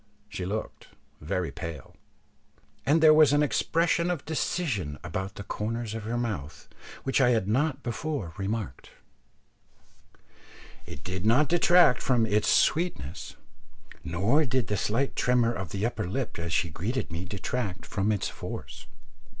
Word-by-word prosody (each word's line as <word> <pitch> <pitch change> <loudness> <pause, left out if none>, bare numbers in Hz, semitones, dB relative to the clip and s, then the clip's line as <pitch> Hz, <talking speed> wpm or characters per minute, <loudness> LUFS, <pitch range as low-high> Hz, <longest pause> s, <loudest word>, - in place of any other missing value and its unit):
She 90 -3 -4
looked 105 +3 -5 0.3
very 85 +3 -2
pale, 85 -6 -7 0.9
and 160 +3 +4
there 155 -1 +9
was 155 -2 +6
an 145 0 +4
expression 170 +3 +1
of 175 -6 -2
decision 130 - -2
about 95 +4 -4
the 100 - -7
corners 110 +2 -3
of 110 -2 -5
her 115 +2 -2
mouth 80 - -4 0.4
which 135 +1 +1
I 125 - +5
had 115 -5 +2
not 135 +5 0
before 120 - -3
remarked. 100 +2 -4 2.0
It 70 - -9
did 95 0 -4
not 130 +7 +4
detract 175 -6 +5
from 120 -4 +2
its 105 -1 +1
sweetness, 100 - +1 0.7
nor 100 - +2
did 130 -2 0
the 105 - +1
slight 115 +7 0
tremor 120 -1 +2
of 95 -7 -5
the 100 +3 -2
upper 110 -5 -2
lip 115 -2 -3
as 85 0 -3
she 85 -1 +1
greeted 115 - -3
me 85 +2 -4
detract 100 +1 -4
from 100 +2 0
its 105 -3 0
force. - - -8
110 Hz, 145 wpm, -28 LUFS, 95-135 Hz, 2.0 s, there